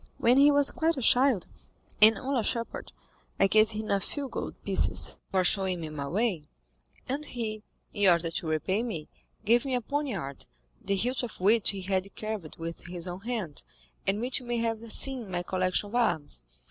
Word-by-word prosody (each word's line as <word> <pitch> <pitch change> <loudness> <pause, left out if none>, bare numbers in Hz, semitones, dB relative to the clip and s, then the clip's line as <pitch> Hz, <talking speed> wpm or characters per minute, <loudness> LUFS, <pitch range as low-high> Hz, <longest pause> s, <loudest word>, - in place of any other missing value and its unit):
When 245 +3 +4
he 285 +1 +7
was 285 -1 +4
quite 325 -1 0
a - - -2
child, 250 -5 +5 0.6
and 220 +1 +8
only 270 -1 -1
a - - -1
shepherd, 230 +1 -3 0.5
I - - +6
gave 215 +2 +5
him 215 0 -4
a 200 - +3
few 280 +6 -4
gold - - -5
pieces - - +2
for 185 -1 +2
showing 190 -1 +2
me 160 - -5
my 145 -2 -5
way, 185 -3 -1 0.6
and 275 +4 -2
he, 225 -6 -4 0.3
in 205 -2 +4
order 170 -1 +2
to 165 - -3
repay 170 +7 0
me, 210 -11 -5 0.4
gave 235 +3 +4
me 265 -2 -1
a 245 - 0
poniard, 220 - -4 0.4
the 200 - 0
hilt 245 +7 0
of 245 -3 -7
which 210 +4 +4
he 195 -1 -2
had 190 +1 -2
carved 215 -7 -5
with 165 0 -7
his 175 0 -3
own 180 +1 -5
hand, 210 -8 -4 0.4
and 195 +2 +1
which 250 +3 0
you 255 - -12
may 240 0 -1
have 230 -1 -2
seen 265 +1 +1
in - - -10
my 175 -1 -2
collection 185 +2 0
of - - -14
arms. 155 - 0
215 Hz, 200 wpm, -28 LUFS, 185-245 Hz, 0.6 s, and